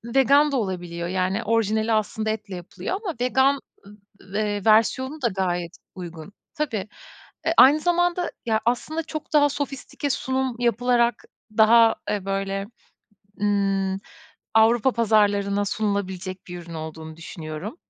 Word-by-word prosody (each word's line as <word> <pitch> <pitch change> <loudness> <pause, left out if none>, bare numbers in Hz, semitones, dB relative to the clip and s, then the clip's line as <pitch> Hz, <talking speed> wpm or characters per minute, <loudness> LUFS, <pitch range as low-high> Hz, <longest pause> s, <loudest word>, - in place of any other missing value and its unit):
vegan 280 +3 +5
da 275 - 0
olabiliyor. 175 -5 -3
Yani, 190 +4 -1
orijinali 220 0 +1
aslında 215 0 -1
etle 210 -3 -4
yapılıyor 180 - -5
ama 360 -6 -3
vegan 265 +2 +3 0.6
v 200 +2 -5
eee, 205 -2 -2
versiyonu 260 +7 +3
da 245 - +2
gayet 180 -4 -2 0.2
uygun. 175 0 -9 0.2
Tabii. 250 - -2 0.6
Eee, 325 - +2
aynı 285 +4 +8
zamanda 350 +1 +1
ya 220 -1 +1
aslında 305 +7 -1
çok 310 -1 -7
daha 290 -1 +5
sofistike 280 0 -4
sunum 260 -1 -1
yapılarak 240 0 +2 0.3
daha, 225 +1 +6
eee, 205 -2 -2
böyle, 195 0 -2 0.8
ııı, 195 -2 +1 0.6
Avrupa 230 +3 +5
pazarlarına 205 -3 +2
sunulabilecek 190 -3 -3
bir 175 0 -6
ürün 170 -1 -10
olduğunu 160 0 -7
düşünüyorum. 165 - -7
215 Hz, 125 wpm, -24 LUFS, 190-260 Hz, 0.8 s, aynı